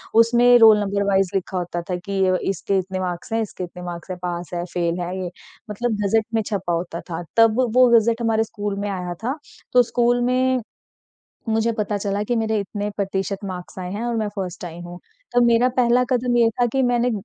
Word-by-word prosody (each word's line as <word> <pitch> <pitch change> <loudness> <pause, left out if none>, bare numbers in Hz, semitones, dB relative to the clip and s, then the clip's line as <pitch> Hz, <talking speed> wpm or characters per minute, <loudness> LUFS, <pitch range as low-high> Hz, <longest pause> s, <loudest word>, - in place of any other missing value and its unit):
उसमें 240 +2 +6
roll 220 -2 +8
number 200 0 -1
vice 195 -2 +2
लिखा 190 0 -2
होता 175 -1 -3
था 180 - 0
कि 190 +2 -2
अ, 185 - +3
इसके 195 +1 -1
इतने 190 0 -3
मार्क्स 180 +4 -4
हैं, 225 - +1
इसके 205 -3 -5
इतने 180 0 -8
मार्क्स 175 0 -7
हैं, 180 - -4
पास 175 -1 -4
है, 175 - -2
फ़ेल 170 0 -1
है 175 +1 -4
ये। 175 - -5 0.4
मतलब 220 +1 -2
गज़ट 215 +2 +2
में 225 - +2
छपा 195 -5 -2
होता 170 0 -3
था। 170 +1 -4
तब 225 +1 +5
व 250 - +2
वो 255 0 +7
गज़ट 230 +1 +1
हमारे 225 -1 +2
स्कूल 210 -2 -4
में 205 - -2
आया 180 -2 -4
था। 265 +6 -1 0.4
तो 250 - +6
स्कूल 240 +1 +1
में, 255 0 +2 0.9
मुझे 225 +1 +1
पता 210 -2 -2
चला 200 0 -2
कि 240 - +2
मेरे 220 -1 0
इतने 205 +1 -4
प्रतिशत 195 0 -2
मार्क्स 185 -1 -7
आए 180 0 -5
हैं 210 +4 -4
और 240 -1 -1
मैं 215 -2 -1
फर्स्ट 185 -3 -5
आई 170 0 -8
हूँ। 175 +1 -9 0.3
तो 245 - +4
मेरा 235 +1 +4
पहला 245 0 +4
कदम 245 -1 +1
ये 230 -1 +5
था 245 - +4
कि 270 - +2
मैंने 245 -1 +2
अ, - - -1
205 Hz, 225 wpm, -22 LUFS, 185-235 Hz, 0.9 s, roll